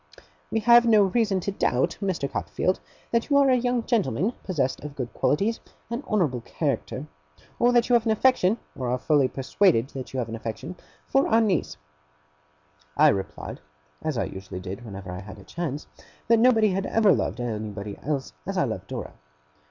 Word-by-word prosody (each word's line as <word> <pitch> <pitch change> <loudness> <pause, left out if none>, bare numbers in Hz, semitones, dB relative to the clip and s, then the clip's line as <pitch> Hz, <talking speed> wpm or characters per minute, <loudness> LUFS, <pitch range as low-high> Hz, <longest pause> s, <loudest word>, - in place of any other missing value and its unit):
We 225 - 0
have 240 +2 +7
no 215 -3 +6
reason 195 -1 +1
to 200 - -2
doubt, 130 -9 0
Mr. 185 -8 -1
Copperfield, 185 +6 -1 0.3
that 235 +3 +1
you 285 - +4
are 275 -1 +5
a - - +5
young 245 -1 0
gentleman 215 - 0
possessed 140 -9 -1
of 145 -1 -8
good 125 -4 -5
qualities 205 +10 +1 0.3
and 235 +4 -3
honourable 155 - 0
character; 115 - -3 0.5
or 240 +1 +4
that 240 -1 +3
you 245 - +1
have 235 -1 +4
an - - +3
affection 220 -3 +3 0.2
or 125 -3 -3
are 125 - +1
fully 140 0 +3
persuaded 135 - +2
that 130 -2 -7
you 130 - -5
have 120 -3 -1
an 115 - -5
affection 115 +9 -6 0.3
for 270 +1 +2
our 225 - +4
niece.' 210 -6 0 1.2
I - - +7
replied, 95 -1 -3 0.4
as 155 -5 -2
I - - +1
usually 95 -1 -7
did 95 +5 -7
whenever 100 -4 -8
I 90 - -5
had 100 +1 -10
a 100 - -13
chance, 155 - -4 0.4
that 230 0 +5
nobody 225 -3 +5
had 195 +1 -1
ever 215 -3 +4
loved 115 - -1
anybody 105 -3 -4
else 140 -2 -3
as - - -3
I - - +3
loved - - -4
Dora. - - -6
175 Hz, 185 wpm, -25 LUFS, -, 1.2 s, have